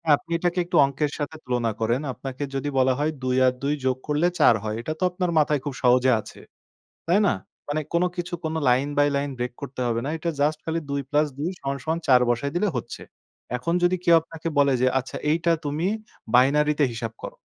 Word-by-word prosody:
আপনি 165 Hz, -, -13 dB
এটাকে 175 Hz, +1 st, 0 dB
একটু 175 Hz, -, -4 dB
অঙ্কের 140 Hz, +2 st, -2 dB
সাথে 145 Hz, +2 st, -3 dB
তুলনা 120 Hz, -2 st, 0 dB
করেন। 115 Hz, +4 st, +1 dB
আপনাকে 135 Hz, +2 st, -6 dB
যদি 135 Hz, +2 st, -2 dB
বলা 130 Hz, 0 st, +4 dB
হয় 150 Hz, +2 st, +1 dB
২ 130 Hz, 0 st, +1 dB
আর 125 Hz, -, +3 dB
২ 145 Hz, +2 st, +1 dB
যোগ 130 Hz, -1 st, +1 dB
করলে 150 Hz, +3 st, +2 dB
৪ -, -, +6 dB
হয়। 110 Hz, 0 st, -2 dB
এটা 155 Hz, -, -3 dB
তো 185 Hz, -, -2 dB
আপনার 180 Hz, -1 st, -1 dB
মাথায় 150 Hz, -1 st, +2 dB
খুব 145 Hz, -, -3 dB
সহজে 125 Hz, +1 st, +5 dB
আছে। -, -, -13 dB, 0.7 s
তাই 180 Hz, +4 st, +4 dB
না? -, -, +3 dB, 0.3 s
মানে 150 Hz, +1 st, -1 dB
কোনো 175 Hz, +1 st, +3 dB
কিছু 175 Hz, -1 st, -5 dB
কোনো 160 Hz, 0 st, -2 dB
line 130 Hz, +4 st, +2 dB
by 145 Hz, 0 st, +5 dB
line 140 Hz, 0 st, -1 dB
break 125 Hz, 0 st, -3 dB
করতে 135 Hz, -2 st, -6 dB
হবে 115 Hz, -1 st, 0 dB
না। 145 Hz, -, -2 dB
এটা 170 Hz, +2 st, -2 dB
জাস্ট 150 Hz, +1 st, +2 dB
খালি 165 Hz, +1 st, -1 dB
২ 140 Hz, 0 st, -1 dB
plus 150 Hz, +1 st, +2 dB
২ 155 Hz, +4 st, -1 dB
সমান, 140 Hz, 0 st, -3 dB
সমান 160 Hz, +1 st, -1 dB
৪ 125 Hz, -2 st, +6 dB
বসায় 120 Hz, +4 st, 0 dB
দিলে 200 Hz, +4 st, +2 dB
হচ্ছে। 120 Hz, -, -6 dB, 0.6 s
এখন 170 Hz, +8 st, -2 dB
যদি 175 Hz, +1 st, +4 dB
কেউ 170 Hz, -1 st, +6 dB
আপনাকে 165 Hz, 0 st, -8 dB
বলে 140 Hz, -1 st, +4 dB
যে 130 Hz, -, +4 dB
আচ্ছা 130 Hz, -, -7 dB
এইটা 170 Hz, +1 st, +2 dB
তুমি 150 Hz, +4 st, -1 dB, 0.5 s
binary 150 Hz, +4 st, +4 dB, 0.2 s
হিসাব 115 Hz, -1 st, -5 dB
করো -, -, -7 dB
145 Hz, 215 wpm, -24 LUFS, 130-160 Hz, 0.7 s, ৪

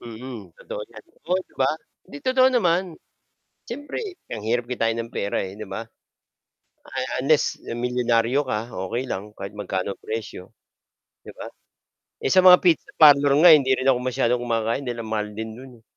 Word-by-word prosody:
Mm, 115 Hz, -4 st, -9 dB
totoo 105 Hz, -, -7 dB
yan. 110 Hz, -2 st, -13 dB
Totoo 180 Hz, +2 st, -3 dB
'di -, -, -29 dB
ba? 130 Hz, -, +4 dB, 0.4 s
Hindi, 145 Hz, -, -9 dB
totoo 255 Hz, 0 st, +4 dB
naman. 185 Hz, -8 st, +2 dB, 0.8 s
Siyempre, 290 Hz, -, -6 dB, 0.3 s
ang 105 Hz, -, -5 dB
hirap 120 Hz, +1 st, 0 dB
kitain 115 Hz, -2 st, 0 dB
ng 115 Hz, 0 st, -5 dB
pera, 100 Hz, -, -2 dB
eh, 95 Hz, 0 st, -7 dB
'di 110 Hz, -, -7 dB
ba? 115 Hz, -, -5 dB, 1.0 s
A -, -, -7 dB, 0.2 s
unless 150 Hz, +2 st, +1 dB
milyonaryo 120 Hz, +2 st, 0 dB
ka, 115 Hz, -2 st, -4 dB, 0.2 s
okey 125 Hz, +5 st, -2 dB
lang 105 Hz, +1 st, -5 dB
kahit 100 Hz, +1 st, -7 dB
magkano 100 Hz, -1 st, -3 dB
presyo. 110 Hz, -4 st, -6 dB, 0.7 s
'Di -, -, -10 dB
ba? -, -, -8 dB, 0.7 s
Eh, -, -, -1 dB
sa 185 Hz, -1 st, +5 dB
mga 180 Hz, -1 st, +9 dB
pizza 170 Hz, -5 st, +3 dB
parlor 145 Hz, -2 st, +7 dB
nga 175 Hz, -, +10 dB
hindi 135 Hz, -3 st, +1 dB
rin 130 Hz, +1 st, -2 dB
ako 125 Hz, -2 st, +4 dB
masyadong 125 Hz, -1 st, 0 dB
kumakain 115 Hz, +2 st, -1 dB
dahil 120 Hz, -1 st, -4 dB
ang 110 Hz, -, -8 dB
mahal 105 Hz, -1 st, -1 dB
din 110 Hz, +1 st, -6 dB
do'n, 130 Hz, +1 st, -12 dB
eh. -, -, -31 dB
120 Hz, 175 wpm, -23 LUFS, 110-140 Hz, 1.0 s, nga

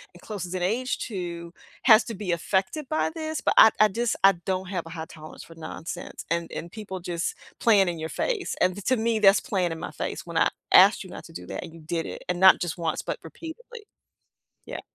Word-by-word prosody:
and 175 Hz, -, -15 dB
closest 185 Hz, -4 st, -6 dB
in 180 Hz, -, -2 dB
age 245 Hz, +7 st, 0 dB
to, 170 Hz, -4 st, -6 dB, 0.3 s
has 220 Hz, -2 st, +7 dB
to 225 Hz, -, -5 dB
be 190 Hz, -3 st, -3 dB
affected 190 Hz, -, -1 dB
by 310 Hz, -, +1 dB
this, 315 Hz, -3 st, -4 dB
but -, -, +2 dB
I 220 Hz, -, +10 dB
I 215 Hz, -, +7 dB
just 235 Hz, +3 st, -1 dB
I 195 Hz, -, +9 dB
don't 190 Hz, -1 st, -2 dB
have 180 Hz, -4 st, -3 dB
a -, -, -9 dB
high 160 Hz, -1 st, -5 dB
tolerance 155 Hz, -1 st, -11 dB
for 165 Hz, -, -14 dB
nonsense 165 Hz, +2 st, -7 dB
and 170 Hz, 0 st, -1 dB
and 170 Hz, +1 st, -6 dB
people 200 Hz, -4 st, -7 dB
just 170 Hz, -1 st, -3 dB, 0.2 s
playing 200 Hz, -5 st, +4 dB
in 170 Hz, -2 st, -5 dB
your 160 Hz, 0 st, -4 dB
face, 435 Hz, -7 st, -2 dB
and 185 Hz, +2 st, +1 dB
to 255 Hz, -, +3 dB
me, 225 Hz, 0 st, +1 dB
that's 200 Hz, -1 st, +6 dB
playing 180 Hz, -4 st, -1 dB
in -, -, -7 dB
my -, -, -6 dB
face -, -, -5 dB
when -, -, -4 dB
I -, -, +4 dB, 0.2 s
asked -, -, +7 dB
you -, -, -12 dB
not -, -, -9 dB
to -, -, -14 dB
do 90 Hz, 0 st, -8 dB
that, 95 Hz, -, -5 dB
and 165 Hz, -, -10 dB
you 165 Hz, -, -13 dB
did 165 Hz, +1 st, -3 dB
it, -, -, -8 dB
and 180 Hz, 0 st, -1 dB
not 190 Hz, 0 st, +8 dB
just 175 Hz, -2 st, -2 dB
once, 165 Hz, -2 st, -2 dB
but -, -, -4 dB
repeatedly. 440 Hz, +7 st, -10 dB, 0.8 s
Yeah. -, -, -6 dB
190 Hz, 235 wpm, -26 LUFS, 170-225 Hz, 0.8 s, I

